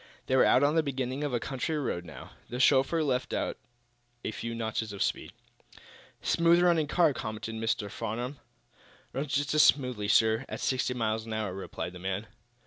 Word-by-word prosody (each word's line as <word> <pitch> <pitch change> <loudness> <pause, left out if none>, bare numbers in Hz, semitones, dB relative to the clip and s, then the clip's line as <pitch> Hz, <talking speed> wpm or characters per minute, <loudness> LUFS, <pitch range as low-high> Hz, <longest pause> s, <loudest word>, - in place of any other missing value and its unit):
They 130 - +1
were 130 - +6
out 130 - +5
on 145 +1 +4
the 165 - +4
beginning 135 -1 -3
of 145 - -1
a 120 - 0
country 135 +5 -2
road, 115 -11 -2
now. 80 - -10 0.2
The 125 - -4
chauffeur 135 +5 +4
let 130 -3 -1
out - - -2 0.7
a - - -1
few 115 +2 -5
notches 110 -1 -2
of 100 - -1
speed. - - -2 0.9
"Smooth 170 +1 +4
running 170 -4 +3
car," 165 -1 +3
commented 110 -1 -5
Mr. 110 -1 -1
Farnum. 120 +7 -4 0.7
"Runs 135 +1 -3
just 145 +1 0
as 155 - +6
smoothly, 125 -9 +3
sir, 110 +3 +4
at - - -5
sixty 125 -1 0
miles 110 -1 -1
an 110 - -4
hour," 110 -4 -2
replied 95 -1 -5
the 90 - -9
man. 95 +3 -3
125 Hz, 185 wpm, -29 LUFS, 110-145 Hz, 0.9 s, were